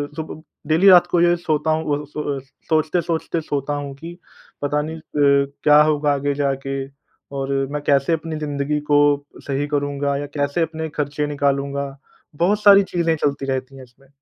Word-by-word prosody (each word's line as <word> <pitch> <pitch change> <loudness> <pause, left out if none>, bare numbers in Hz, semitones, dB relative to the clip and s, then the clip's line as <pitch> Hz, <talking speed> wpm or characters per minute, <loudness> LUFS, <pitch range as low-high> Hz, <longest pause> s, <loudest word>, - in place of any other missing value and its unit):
सु 155 -1 -7 0.3
डेली 165 +6 +4
रात 175 -2 +7
को 175 - +1
ये 175 - +5
है 175 - +3
सोता 155 -2 0
हूँ, 155 -2 0
अ, - - -10
सोए 145 -2 -3 0.3
सोचते-सोचते 165 +1 0
सोता 145 -1 -3
हूँ 145 -1 -4
कि 165 +5 -10 0.4
पता 145 +1 0
नहीं 160 +2 -5
अ, - - -12 0.6
क्या 150 0 +7
होगा 150 -1 +1
आगे 140 0 -1
जाके 135 -1 -2 0.5
और 135 0 -3 0.2
मैं 150 0 -3
कैसे 140 +2 +2
अपनी 160 0 -3
ज़िंदगी 145 0 -2
को 145 - +6 0.5
सही 140 +1 -1
करूँगा 145 -1 -1
या 145 - -4
कैसे 145 +3 0
अपने 160 0 -4
ख़र्चे 150 0 -2
निकालूँगा। 140 -1 -1 0.4
बहुत 195 +7 +1
सारी 200 -1 +8
चीज़ें 165 -2 +1
चलती 140 -2 -1
रहती 130 0 -3
हैं 130 - -10
इसमें। 130 +2 -21
145 Hz, 175 wpm, -21 LUFS, 140-160 Hz, 0.6 s, सारी